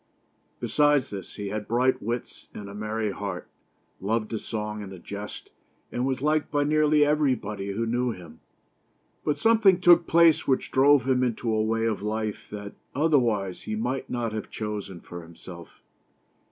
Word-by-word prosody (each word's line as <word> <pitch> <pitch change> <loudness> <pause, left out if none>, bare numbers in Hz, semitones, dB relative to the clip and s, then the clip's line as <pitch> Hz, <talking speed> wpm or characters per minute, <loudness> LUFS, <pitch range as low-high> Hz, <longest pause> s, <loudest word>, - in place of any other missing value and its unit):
Besides 145 -3 +2
this, 95 -3 -7
he 100 -1 -4
had 105 +1 -4
bright 125 +3 +2
wits, 120 +3 -5
and 100 - -7
a 100 - -9
merry 105 0 -2
heart; 95 -3 -5 0.5
loved 110 +3 -1
a 110 - -1
song 105 -1 -4
and 100 -2 -8
a 95 - -8
jest; 100 +3 -8 0.4
and 125 +2 -1
was 130 0 -2
liked 155 0 +1
by 145 0 +1
nearly 150 0 +4
everybody 125 -10 0
who 115 +3 -1
knew 120 +2 0
him. 85 -7 -8 0.8
But 150 - 0
something 220 -5 +5
took 175 -1 +6
place 165 -1 +5
which 130 - +1
drove 135 -1 +5
him 130 -1 +3
into 115 -2 -1
a 110 - +2
way 115 +1 0
of 110 -3 -1
life 110 0 -3
that, 105 -1 -7 0.2
otherwise, 120 - +1
he 110 - -4
might 125 +5 -2
not 115 -3 -2
have 110 - -5
chosen 105 -5 -5
for 85 0 -9
himself. 85 +1 -12
115 Hz, 165 wpm, -26 LUFS, 105-140 Hz, 0.8 s, took